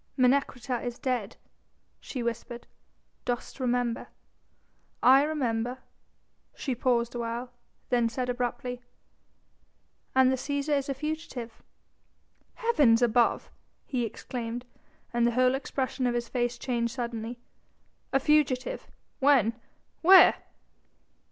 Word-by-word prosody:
"Menecreta 255 -1 +1
is 245 -1 -4
dead," 240 -5 -2 0.6
she 255 -4 -5
whispered; 235 +1 -4 0.6
"dost 245 +2 -4
remember?" 245 -2 -1 1.0
"I 265 +2 +8
remember." 250 -5 -1 0.8
She 270 - -2
paused 240 -1 +1
a 240 - -4
while, 235 +2 -4 0.4
then 240 -2 +2
said 250 +2 -3
abruptly: 245 0 -3 1.3
"And 260 0 +5
the 260 - 0
Cæsar 285 +2 -1
is 280 0 -2
a 275 - -1
fugitive." 275 -6 -5 0.9
"Heavens 290 - +3
above!" 235 0 +2 0.3
he 255 -4 -1
exclaimed, 235 +1 -5 0.5
and 235 0 +3
the 240 - 0
whole 255 +1 +3
expression 265 -1 -2
of 240 - 0
his 240 -1 -2
face 240 -1 -1
changed 235 -2 -2
suddenly; 235 -1 -4 0.7
"a 270 - +3
fugitive?... 300 - +1 0.3
when?... 265 -5 +4 0.5
where...?" 370 +3 +9
250 Hz, 110 wpm, -28 LUFS, 235-270 Hz, 1.3 s, where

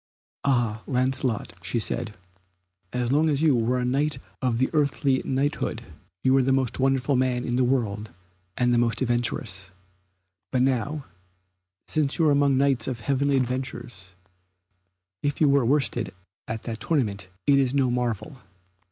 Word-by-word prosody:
"Ah, 120 -5 +1
Lancelot," 130 -3 0
said 110 +4 -1
she, 90 -1 -27
"as 120 0 0
long 155 +3 +3
as 145 0 +1
you 150 -5 +5
were 120 +2 +1
a 125 - -1
knight 140 +3 0 0.2
of 125 -3 0
earthly 140 -3 +2
knighthood 140 +3 -1 0.4
you 130 - +4
were 135 - +5
the 130 +1 +1
most 130 -2 +1
wonderful 135 +1 +2
man 125 -1 +1
in 120 - -1
the 130 - +3
world 110 -5 0 0.5
and 125 0 +3
the 120 - +4
most 120 +2 +1
adventurous. 115 -6 -1 0.8
But 130 -1 +2
now, 135 +3 0 0.8
since 150 -3 +1
you 165 - +3
are - - +5
set 140 - +4
among 140 -2 +3
Knights 135 -4 +2
of 120 -4 -3
heavenly 140 +3 +1
adventures, 125 -7 -4 1.1
if 145 -1 -1
you 155 - +5
were 140 -1 +4
worsted 120 -5 0 0.3
at 110 0 -4
that 115 -2 -5
tournament 105 - -1 0.2
it 140 -1 +5
is 135 0 +1
no 130 -3 +2
marvel. 120 +1 -2
130 Hz, 155 wpm, -25 LUFS, 115-140 Hz, 1.1 s, you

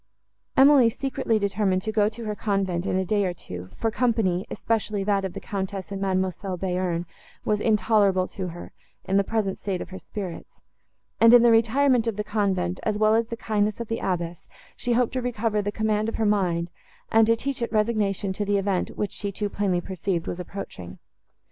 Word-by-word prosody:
Emily 270 -3 +7
secretly 265 -2 -1
determined 200 -2 0
to 220 - -2
go 210 -1 +3
to 225 +1 -9
her 210 - -2
convent 195 -4 -1
in - - 0
a 190 - 0
day 205 +2 +1
or 180 -2 -1
two; 90 - -8
for 225 - -1
company, 220 -7 +1
especially 215 -3 -1
that 200 -1 +1
of 190 -2 -3
the - - -5
Countess 195 -1 -4
and 195 -1 -4
Mademoiselle 190 0 -1
Bearn, 180 -2 -1 0.4
was 210 -1 +1
intolerable 205 -3 +3
to 190 -2 -5
her, 175 0 -8 0.3
in 195 - +1
the 200 - +4
present 205 -2 -1
state 190 -3 -2
of - - -7
her 190 0 -8
spirits; 190 -5 -7 0.7
and, 230 +1 +8
in 240 - +7
the 240 - +6
retirement 235 +2 +3
of 225 - 0
the 210 - -2
convent, 190 -4 -1
as 215 -1 -1
well 215 0 +4
as 225 0 +2
the 230 - -5
kindness 210 -1 0
of 235 - -5
the 225 - -1
abbess, 175 -2 -3 0.3
she 245 0 -1
hoped 245 0 +1
to 255 - -1
recover 225 -3 0
the 205 0 -2
command 215 0 0
of - - -5
her 225 - 0
mind, 180 -5 +1 0.4
and 225 0 +5
to 230 - +5
teach 270 +2 -4
it 235 - -2
resignation 210 -3 0
to 205 - -2
the 205 0 +1
event, 195 -2 0
which, 205 - -1
she 200 -1 -4
too 205 +1 -3
plainly 195 -3 0
perceived, 180 -2 -3
was 175 - -4
approaching. 95 - -7
205 Hz, 205 wpm, -25 LUFS, 185-225 Hz, 0.7 s, and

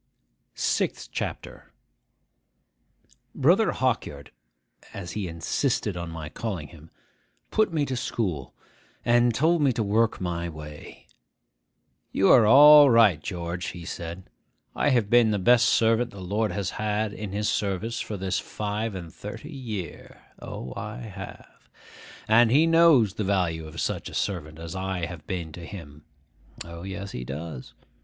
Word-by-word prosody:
SIXTH - - -1
CHAPTER - - -6 1.6
BROTHER - - +3
HAWKYARD 70 0 -2 0.6
(as 90 -4 -6
he 105 -3 -3
insisted 95 - -1
on 85 -1 -5
my 80 -2 -7
calling 90 -4 -5
him) 80 -1 -15 0.6
put 215 -3 +2
me 155 -3 0
to 130 - -3
school, 90 - -3 0.5
and 120 0 +4
told 165 +5 +2
me 140 -2 +4
to 115 -2 -1
work 110 +3 +1
my 85 -1 -3
way. 75 -1 -11 1.1
'You 95 - +4
are 115 -4 +7
all 145 +4 +9
right, 110 -10 +5
George,' 85 0 -4
he 85 -2 -7
said. 85 +2 -6 0.5
'I - - +2
have 120 -6 +2
been 120 -2 +6
the 105 - +1
best 120 +5 +4
servant 115 +1 +3
the 100 - -12
Lord 105 +4 -1
has 100 -3 -3
had 105 0 -2
in 105 -3 -6
his 105 +1 -1
service 105 +3 -1
for 105 - -4
this 95 0 -1
five 105 0 -4
and 85 -4 -8
thirty 115 +9 -8
year 110 -10 -7 0.2
(O, 65 -1 -7
I 105 +2 -6
have!); 110 -6 -10 0.6
and 115 +1 +5
he 145 +7 +5
knows 165 - +5
the 105 - -3
value 90 -5 0
of 75 - -9
such - - -2
a - - -10
servant 80 -6 -3
as 80 +1 -7
I 95 -2 -2
have 85 -3 -9
been 85 -4 -4
to 85 +2 -10
him 75 -5 -10 0.6
(O, 85 0 -9
yes, 100 +1 -6
he 60 - -5
does!) 70 +1 -7
100 Hz, 150 wpm, -26 LUFS, 85-115 Hz, 1.6 s, all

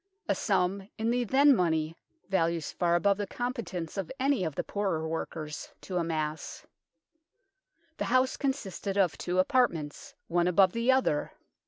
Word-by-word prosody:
a - - +3
sum 190 +2 0
in 225 +1 0
the 245 0 +1
then 275 +4 +5
money 160 -4 0 0.3
values 170 -4 0
far 175 -1 +1
above 200 +3 +3
the 205 -1 -3
competence 230 - -4
of 195 -4 -3
any 270 -5 +2
of 160 -4 -3
the - - -1
poorer 190 -6 -1
workers 155 -1 -5
to 185 - -4
amass. 160 -2 -3 1.3
The - - -1
house 255 +1 +2
consisted 210 -8 -3
of 185 -5 +3
two 180 +1 -3
apartments, 245 - +1
one 175 +1 +2
above 185 +1 +5
the 230 +2 +3
other. 260 - +1
190 Hz, 150 wpm, -29 LUFS, 165-240 Hz, 1.3 s, then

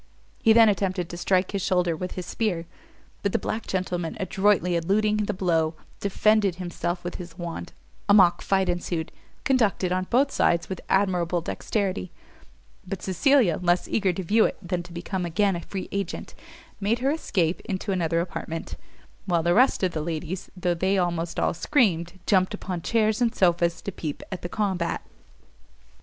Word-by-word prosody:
He 225 - +5
then 225 0 +7
attempted 185 -4 0
to 175 - -6
strike 185 +1 +1
his 200 -1 -2
shoulder 180 -2 +1
with 180 +3 -5
his 185 - -5
spear, 180 -5 -1 0.6
but 200 - -1
the - - +4
black 225 - -4
gentleman, 180 -1 -2
adroitly 190 -2 +2
eluding 210 +5 +2
the 210 0 0
blow, 165 -4 +1 0.2
defended 200 -1 +2
himself 175 -1 -3
with 175 - -5
his 175 -2 -9
wand: 170 -2 -6 0.4
a - - +7
mock 180 -4 +5
fight 190 -1 +1
ensued, 175 -2 -2 0.3
conducted 220 -8 +2
on 185 0 0
both 275 +4 +3
sides 170 -1 +2
with 190 - -5
admirable 180 -3 +2
dexterity; 185 - -2 0.8
but 190 -1 -5
Cecilia, 215 - +3
less 175 0 +2
eager 195 -4 +1
to 185 +2 -4
view 215 +6 +4
it - - -2
than 180 -2 -3
to 175 0 -13
become 180 +2 -4
again 190 +3 +1
a 170 - -4
free 190 +2 -6
agent, 200 -3 -4 0.5
made 210 +3 +1
her 265 +3 +1
escape 185 - 0
into 195 +1 -3
another 170 -3 +1
apartment; 165 -2 -5 0.5
while 170 -3 +2
the 175 +1 +3
rest 250 -1 +4
of 185 - +2
the 155 - -3
ladies, 170 +3 -4
though 180 -1 +1
they 190 +3 +1
almost 170 -2 -1
all - - +1
screamed, 180 - +1
jumped 185 -2 +3
upon 180 -2 -5
chairs 220 +3 +1
and 240 0 +2
sofas 170 -2 +2
to 200 - -3
peep 155 -5 -5
at 190 - -5
the 175 - -5
combat. 190 -5 -1
185 Hz, 175 wpm, -25 LUFS, 170-200 Hz, 0.8 s, then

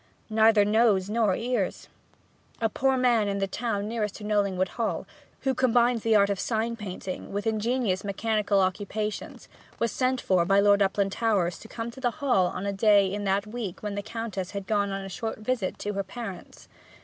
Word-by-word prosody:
'Neither 220 -1 +5
nose 210 -2 +3
nor 215 -4 +2
ears!' 230 -5 -2 0.7
A 225 - +1
poor 265 +4 +1
man 240 -4 +3
in 200 0 -1
the 195 - +1
town 205 0 -2
nearest 215 -3 -2
to 215 - -9
Knollingwood 200 -3 +1
Hall, 230 -2 -2 0.4
who 265 -2 +1
combined 245 -2 +3
the 225 0 +2
art 200 -1 +4
of 195 - -2
sign 230 +1 -1
painting 190 -3 -6
with 205 +2 -3
ingenious 220 -2 0
mechanical 205 0 +1
occupations, 205 +3 -3 0.3
was 230 -2 0
sent 255 0 0
for 185 -5 +2
by 195 +3 +3
Lord 205 0 +5
Uplandtowers 195 -1 +1
to - - -11
come 230 +1 -5
to 265 - -12
the 245 - +2
Hall 245 -11 +2
on 185 +2 -4
a 200 - -1
day 200 -1 +4
in 205 0 -3
that 195 +1 +1
week 215 -4 -6
when 210 -1 -3
the 205 - -3
Countess 220 -3 -5
had 200 -1 -5
gone 205 -1 +1
on 195 0 -4
a - - -5
short 220 +4 -4
visit 215 -3 -2
to 205 - -4
her 200 0 -1
parents. 195 -2 -8
210 Hz, 190 wpm, -27 LUFS, 195-230 Hz, 0.7 s, Neither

